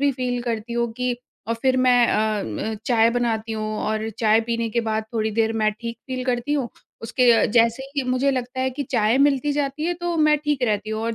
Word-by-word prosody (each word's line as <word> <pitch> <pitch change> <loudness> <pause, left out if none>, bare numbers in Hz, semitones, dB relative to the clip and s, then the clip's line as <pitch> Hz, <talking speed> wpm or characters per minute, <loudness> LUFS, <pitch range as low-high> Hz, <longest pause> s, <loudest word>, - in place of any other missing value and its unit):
भी 285 0 +3
फ़ील 250 -1 -2
करती 235 -1 -3
हूँ 235 0 0
कि 250 -1 -1 0.3
और 230 - +1
फिर 260 -1 +3
मैं 250 -2 +4
अ, 215 -1 +1 0.3
उम, - - -3
चाय 230 -2 +4
बनाती 230 -2 -1
हूँ 215 0 -3
और 215 +1 -1
चाय 220 0 +4
पीने 230 0 0
के 235 - +1
बाद 220 0 -1
थोड़ी 220 -1 0
देर 225 0 +1
मैं 215 0 +3
ठीक 230 -1 -5
फ़ील 255 -1 -4
करती 250 +2 -1
हूँ, 275 -5 0 0.3
उसके 235 0 +3
जैसे 230 +2 +3
ही 280 - +1
मुझे 255 +2 +2
लगता 255 -1 -3
है 260 0 0
कि 265 +3 -4
चाय 230 -1 +2
मिलती 285 0 +3
जाती 285 +1 -2
है 350 +1 0
तो 345 -1 -1
मैं 305 -1 +4
ठीक 295 -3 0
रहती 215 -2 0
हूँ 220 0 -3
और 230 0 -2
240 Hz, 225 wpm, -23 LUFS, 225-260 Hz, 0.3 s, मैं